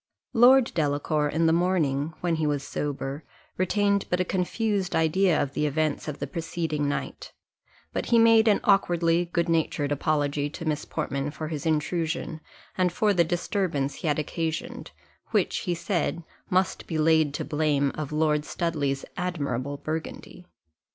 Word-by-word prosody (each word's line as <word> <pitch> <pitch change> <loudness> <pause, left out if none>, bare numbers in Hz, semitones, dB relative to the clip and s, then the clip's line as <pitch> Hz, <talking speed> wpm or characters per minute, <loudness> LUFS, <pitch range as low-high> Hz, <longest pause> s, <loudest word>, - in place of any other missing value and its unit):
Lord 250 +1 +6
Delacour, 150 0 0
in 160 +3 +1
the 160 - +4
morning, 165 -4 +1
when 170 -2 0
he 155 -1 0
was 145 -2 -1
sober, 145 +1 -4 0.3
retained 200 +2 +1
but 180 - +1
a 185 - +1
confused 195 +1 -1
idea 165 +2 +3
of 135 - -1
the 150 - 0
events 155 +1 -1
of 150 -1 -4
the - - -3
preceding 160 -4 -2
night; - - -5 0.6
but - - -2
he 235 - +4
made 225 -1 +6
an 210 - +4
awkwardly 175 -3 +3
good 170 0 +1
natured 155 -3 0
apology 145 -1 0
to 165 +3 -8
Miss 155 -1 -1
Portman 140 +1 -3
for 155 +1 -6
his 160 0 -4
intrusion, 160 0 -1 0.3
and 180 -1 +2
for 205 +4 +2
the 175 -2 +4
disturbance 170 -4 -1
he - - -4
had 150 - +1
occasioned, 165 +10 -3 0.4
which, - - +1
he 175 - +1
said, 170 -1 -1 0.3
must 185 +1 0
be 160 - -2
laid 155 -1 +3
to - - -2
the - - -11
blame 150 -3 +1
of 155 -2 -5
Lord 150 -1 +1
Studley's 145 -5 -2
admirable 145 -7 -2
burgundy. 160 +4 -6
160 Hz, 160 wpm, -26 LUFS, 150-180 Hz, 0.6 s, Lord